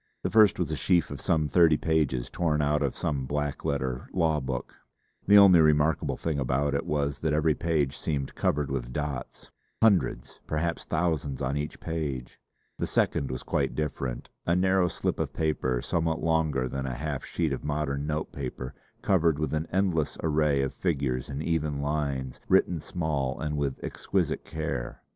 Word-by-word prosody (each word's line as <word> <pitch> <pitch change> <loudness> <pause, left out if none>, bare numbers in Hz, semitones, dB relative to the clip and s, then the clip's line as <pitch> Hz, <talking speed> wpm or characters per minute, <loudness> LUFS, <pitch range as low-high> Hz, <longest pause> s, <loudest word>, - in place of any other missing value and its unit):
The - - -1
first 110 -4 +6
was - - -1
a - - 0
sheaf 90 -4 +2
of - - -6
some 80 -3 +2
thirty 80 +1 +5
pages 75 -7 0
torn 80 -4 0
out 75 +1 +2
of 70 -2 0
some 70 -4 -2
black 75 0 -2
letter 65 -3 -2
law 80 -4 +2
book. 65 -2 -4 0.5
The 100 +1 +8
only 95 -4 +8
remarkable 75 0 +2
thing 80 -3 -2
about 70 +2 0
it 70 - -1
was 70 -2 -1
that 80 -2 0
every 75 +1 +3
page 75 -4 0
seemed 70 -3 -2
covered 70 -2 0
with - - -3
dots 75 -2 -5 0.3
hundreds, 100 - +2
perhaps 85 +2 -1
thousands 80 -5 -1
on 70 +2 -1
each 75 +1 -4
page. 75 -7 -4 0.4
The - - -1
second 70 - +1
was 65 -1 -5
quite - - -1
different: 70 -5 -3 0.2
a 85 - +3
narrow 95 0 +3
slip - - -2
of - - -2
paper 65 -6 0
somewhat 80 -1 0
longer 80 -6 +1
than 65 +1 -3
a 65 - -3
half 70 0 -3
sheet 80 -5 -1
of 65 - -4
modern 75 -1 -2
note 75 0 -2
paper, 65 -1 -5 0.3
covered 85 -5 +3
with 75 +1 -2
an 80 +1 -1
endless 90 -5 +1
array 75 -3 +2
of 70 - -2
figures 70 -8 -1
in 70 +2 -4
even 75 -4 -1
lines, 70 -3 -2
written 90 -2 +3
small 75 -6 -2
and 75 -1 -2
with 70 -2 -2
exquisite - - -1
care. 75 -6 -4
75 Hz, 175 wpm, -28 LUFS, 70-80 Hz, 0.5 s, The